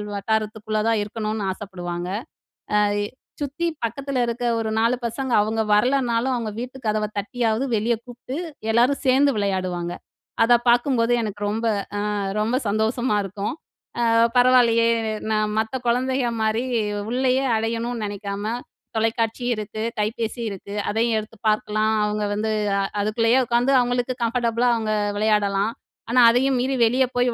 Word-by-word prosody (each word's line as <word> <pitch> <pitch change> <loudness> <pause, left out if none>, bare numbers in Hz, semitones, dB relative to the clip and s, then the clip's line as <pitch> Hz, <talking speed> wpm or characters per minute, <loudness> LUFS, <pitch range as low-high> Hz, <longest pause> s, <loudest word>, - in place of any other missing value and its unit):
வட்டாரத்துக்குள்ள 215 +1 -1
தான் 225 -1 +2
இருக்கணும்னு 215 -1 -3
ஆசப்படுவாங்க. 180 -3 -5 0.7
அ - - +5 0.3
எ - - -2 0.4
சுத்தி 290 +5 -2 0.2
பக்கத்துல 265 +3 -1
இருக்க 235 +1 -2
ஒரு 220 -1 -2
4 230 +2 +2
பசங்க 255 +2 -3
அவுங்க 220 +1 -1
வரலனாலும், 245 +2 +2
அவுங்க 225 -3 -3
வீட்டு 255 +2 -6
கதவ 215 0 +1
தட்டியாவது 225 +3 0
வெளிய 225 +3 +1
கூப்பிட்டு, 245 +2 -7 0.4
எல்லாரும் 245 +5 +3
சேர்ந்து 270 +2 +5
விளையாடுவாங்க. 185 -3 -1 0.5
அத 240 +1 +5
பார்க்கும்போது 240 -1 +3
எனக்கு 205 -2 -5
ரொம்ப 225 +2 -2 0.5
அ - - -1 0.2
ரொம்ப 220 +4 +1
சந்தோஷமா 220 +3 +1
இருக்கும். 200 +1 -4 0.5
"அ - - +2 0.3
பரவால்லையே! 245 -2 +5 0.5
நான் 215 -1 +1
மத்த 220 +3 -2
குழந்தைகள் 250 0 +1
மாரி 220 +1 +1 0.5
உள்ளயே 260 +2 +1
அடையணும்னு 230 +1 -2
நினைக்காம, 200 0 -5 0.5
தொலைக்காட்சி 225 +2 0
இருக்கு, 215 0 -5 0.2
கைப்பேசி 225 +2 -2
இருக்கு, 200 0 -8 0.2
அதையும் 225 +2 +1
எடுத்து 215 +1 -10
பார்க்கலாம். 215 +1 +1
அவுங்க 210 0 -1
வந்து 220 +1 -1 0.3
அ - - +2 0.2
அதுக்குள்ளயே 225 +3 +2
உட்காந்து 240 +3 +2
அவுங்களுக்கு 245 +1 0
கம்ஃபர்டபுளா 235 0 +1
அவுங்க 220 -1 -1 0.2
விளையாடலாம். 210 -1 +2 0.4
ஆனா, 245 +2 +3
அதயும் 260 +2 +2
மீறி 265 +2 0
வெளிய 255 +3 +3
போய் 245 -1 +2
225 Hz, 135 wpm, -23 LUFS, 215-245 Hz, 0.7 s, அ